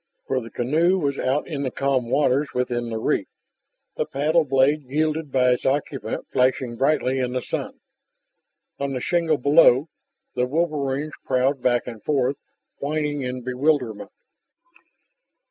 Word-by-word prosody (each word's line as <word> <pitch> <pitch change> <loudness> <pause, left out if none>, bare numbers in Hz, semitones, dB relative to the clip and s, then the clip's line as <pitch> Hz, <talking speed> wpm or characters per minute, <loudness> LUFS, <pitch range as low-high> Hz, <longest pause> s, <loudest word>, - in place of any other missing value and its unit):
For 130 -1 -1
the 115 - -9
canoe 160 +11 +2
was 140 -5 -1
out 135 +3 0
in 150 -4 -4
the 135 - -1
calm 130 -3 0
waters 140 +1 +1
within 120 -1 -1
the 115 - -3
reef, 110 - 0 0.7
the - - -1
paddle 155 +4 +2
blade 135 +1 +2
wielded 155 +1 -1
by 125 -1 +3
its 125 - 0
occupant 130 -5 -2
flashing 125 -1 +1
brightly 135 0 +1
in 125 -1 -1
the 130 - 0
sun. - - -4 1.0
On 140 -1 -2
the 130 - -2
shingle 165 +2 +1
below, 145 +1 +5 0.4
the 125 0 0
wolverines 150 -1 -1
prowled 130 +1 +1
back 120 -1 +2
and 115 -3 -8
forth, 135 -2 +1 0.4
whining 150 0 -2
in 125 -1 -4
bewilderment. 125 -3 0
135 Hz, 145 wpm, -23 LUFS, 125-150 Hz, 1.0 s, below